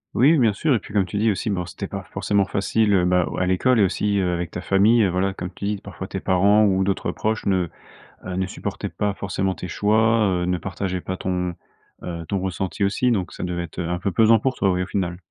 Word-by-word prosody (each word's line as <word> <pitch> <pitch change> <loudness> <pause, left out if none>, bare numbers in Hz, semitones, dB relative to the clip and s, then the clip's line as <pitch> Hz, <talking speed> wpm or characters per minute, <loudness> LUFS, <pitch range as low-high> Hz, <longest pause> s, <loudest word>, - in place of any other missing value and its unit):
Oui, 135 +7 +5
oui, - - +3
bien 115 -5 +3
sûr. 140 +6 +1
Et - - +1
puis 105 - -13
comme 100 -3 +3
tu 100 +3 -5
dis 110 +1 +3
aussi, 100 +3 -2
bah, 90 -3 -1
c'était - - -6
pas - - -6
forcément 100 -1 +1
facile, 105 +2 +1
heu, 90 -2 +4
bah, 90 -1 +3
à 90 - +1
l'école 115 +7 +2
et 105 - +6
aussi, 100 +2 +1
heu, 90 -2 +1
avec 85 -1 -3
ta 90 - -5
famille, 105 +5 +4
heu, 95 - +2
voilà, 95 +2 0
comme 90 -1 -5
tu 100 - -7
dis, 105 0 -1
parfois 95 -1 -8
tes 95 - -4
parents 100 +4 +4
ou 95 -1 +2
d'autres 100 0 -1
proches 110 0 -2
ne, 95 -3 +2 0.6
heu, 90 -1 -4
ne 95 0 0
supportaient - - -5
pas 105 -1 -1
forcément 95 -1 -2
tes 90 - -7
choix. 110 +3 +3 0.2
Heu, - - -1
ne 90 0 0
partageaient 95 +1 -3
pas 95 +1 -4
ton, 90 -2 -2 0.5
heu, 85 -2 -5
ton 100 - -1
ressenti 95 +2 -3
aussi 100 +6 +1
donc 95 -7 -1
ça - - -7
devait 90 -1 -2
être 85 +1 -9
un 90 +1 -2
peu 100 +1 -1
pesant 115 +4 +5
pour 130 +3 -1
toi, 100 - +1
oui, 90 0 +1
au - - -6
final. 90 -3 -2
95 Hz, 255 wpm, -23 LUFS, 90-105 Hz, 0.6 s, et